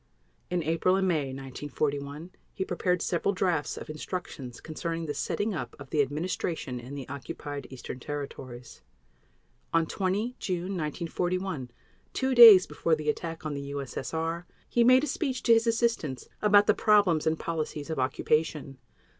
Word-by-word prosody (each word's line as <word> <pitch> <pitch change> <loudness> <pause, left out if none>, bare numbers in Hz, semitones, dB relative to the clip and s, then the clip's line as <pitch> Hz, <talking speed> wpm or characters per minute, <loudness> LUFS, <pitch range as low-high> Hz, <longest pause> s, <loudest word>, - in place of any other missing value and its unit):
In 175 -2 0
April 165 +4 +2
and 190 0 +1
May 160 -6 +1
1941 140 +3 -4 0.2
he 190 - -2
prepared 180 -2 0
several 185 +3 0
drafts 175 -5 0
of - - -7
instructions 155 -5 -6
concerning 165 +1 -4
the 145 - -3
setting 205 +8 -1
up 170 - -5
of 140 -2 -12
the 150 - +3
administration 150 -2 -2
in 125 +4 -8
the 135 -3 -6
Occupied 140 +1 -6
Eastern 130 -1 -8
Territories. 130 - -7 0.9
On 165 -1 +3
20 200 +8 -1
June 185 +1 -2
1941, 175 -2 -2 0.4
two 265 0 0
days 225 -7 +10
before 165 - 0
the 155 -1 -3
attack 165 +1 -7
on 155 - -2
the 140 - -4
U.S.S.R., 160 +5 -4 0.2
he 240 - +3
made 255 +3 +6
a - - 0
speech 270 -2 -2
to 235 - +6
his 225 +1 +3
assistants 225 - 0
about 205 -1 +6
the - - +5
problems 200 -8 +3
and 160 0 +2
policies 155 -2 -4
of 160 - -2
occupation. 135 +1 0
160 Hz, 155 wpm, -28 LUFS, 140-185 Hz, 0.9 s, days